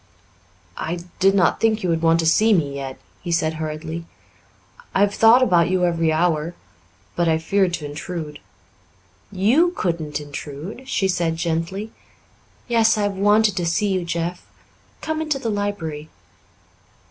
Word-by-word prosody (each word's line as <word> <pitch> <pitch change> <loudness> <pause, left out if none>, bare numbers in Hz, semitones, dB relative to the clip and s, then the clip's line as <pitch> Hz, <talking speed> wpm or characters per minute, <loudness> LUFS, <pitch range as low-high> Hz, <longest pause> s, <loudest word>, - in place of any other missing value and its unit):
"I 170 +2 -3 0.2
did 195 +1 +4
not 185 -3 +3
think 220 -2 +2
you 180 - 0
would 165 -1 0
want 165 0 +3
to - - -2
see 215 +7 +4
me 150 -7 +1
yet," 135 -1 -6 0.2
he 175 - -5
said 160 -1 +1
hurriedly. 160 +1 -5 0.9
"I 195 - +3
have 205 0 +3
thought 230 +4 +6
about 175 -7 +3
you 185 -1 +2
every 165 -2 +1
hour 165 0 0 0.6
but 175 -1 +1
I 160 - +3
feared 180 +2 +1
to 155 - -7
intrude." 150 +1 -6 0.9
"You 245 - +3
couldn't 165 -6 -2
intrude," 150 - -8
she 195 -6 +1
said 170 -3 0
gently. 170 +6 -3 0.8
"Yes, 225 -2 +3
I 210 - 0
have 205 -1 -1
wanted 205 +1 +3
to 175 - 0
see 205 +5 +1
you, 185 -2 0
Jeff. 170 +1 -3 0.6
Come 315 0 -2
into 305 -3 -1
the 230 -4 -3
library." 165 -7 -3
175 Hz, 155 wpm, -22 LUFS, 160-205 Hz, 0.9 s, thought